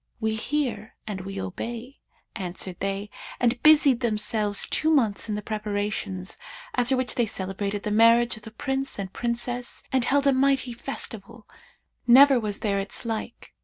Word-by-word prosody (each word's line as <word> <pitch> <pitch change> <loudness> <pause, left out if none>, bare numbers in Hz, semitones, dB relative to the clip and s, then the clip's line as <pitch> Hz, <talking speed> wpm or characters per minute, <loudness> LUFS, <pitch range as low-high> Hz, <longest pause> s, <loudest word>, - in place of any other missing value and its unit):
'We 220 -1 0
hear 235 -5 -2
and 200 -3 -5
we 195 +1 -6
obey,' 235 +7 -6 0.4
answered 185 -2 -3
they 195 +1 -3 0.3
and 240 0 +1
busied 295 -5 +6
themselves 215 -3 +1
two 315 - 0
months 230 -9 +2
in 210 - -1
the 210 - -5
preparations, 205 -3 -3 0.4
after 250 +1 +2
which 255 -1 0
they 240 -2 +1
celebrated 200 +1 -3
the 210 - -2
marriage 230 +2 +5
of 220 - -11
the 220 - -9
Prince 270 +4 -2
and 190 -2 -5
Princess 240 +1 -2
and 260 -2 +2
held 280 +2 +2
a 275 - +5
mighty 265 -1 +2
festival, 230 -3 -6 0.6
never 265 +2 +8
was 210 -3 -4
there 200 -2 0
its 195 +4 -5
like. 225 +1 -5
225 Hz, 160 wpm, -25 LUFS, 205-250 Hz, 0.6 s, never